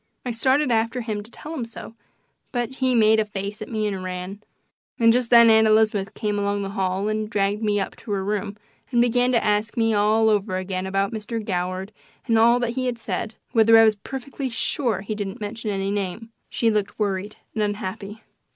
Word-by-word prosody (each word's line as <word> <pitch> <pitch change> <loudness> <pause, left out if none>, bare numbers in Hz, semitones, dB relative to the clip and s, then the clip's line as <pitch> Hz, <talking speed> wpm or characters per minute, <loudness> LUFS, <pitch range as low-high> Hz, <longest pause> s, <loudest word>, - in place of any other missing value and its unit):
I 245 - -1
started 260 +4 +2
after 230 +2 +1
him 215 -3 -3
to 210 - -12
tell 300 +6 -9
him 280 -7 -3
so, 230 -1 -9 0.6
but 245 0 -3
he 260 -1 +2
made 220 -1 +5
a - - +3
face 205 0 -6
at 215 - -6
me 215 -2 -1
and 195 -3 -3
ran; 185 +2 -6 0.6
and 230 -1 +6
just 245 -1 0
then 235 -1 +8
Aunt 220 0 +5
Elizabeth 215 -2 +2
came 210 -1 -1
along 200 0 -1
the 195 - -4
hall 190 0 -1
and 215 0 -2
dragged 205 0 0
me 210 -2 +1
up 195 - -4
to 215 - -9
her 195 -1 -1
room 205 0 -3 0.3
and 240 - +1
began 245 +1 +3
to 235 - +3
ask 210 +1 0
me 225 -1 +2
all 215 +2 +3
over 205 -2 0
again 185 0 -3
about 195 +2 0
Mr. 220 +1 -4
Goward 185 -1 -3 0.3
and 230 -3 +3
all 235 +2 +5
that 240 -1 0
he 255 +1 -1
said 230 -1 -4 0.2
whether 225 -1 +6
I 225 - +8
was 220 -1 +5
perfectly 265 +5 -6
SURE 230 -3 -1
he 205 +2 -4
didn't 205 -2 -5
mention 215 +1 -5
any 195 -1 -1
name. 205 +3 -4 0.2
She 230 -1 +1
looked 210 -2 -1
worried 205 -1 -2 0.2
and 220 - -2
unhappy. 205 +1 -4
215 Hz, 205 wpm, -23 LUFS, 200-230 Hz, 0.6 s, then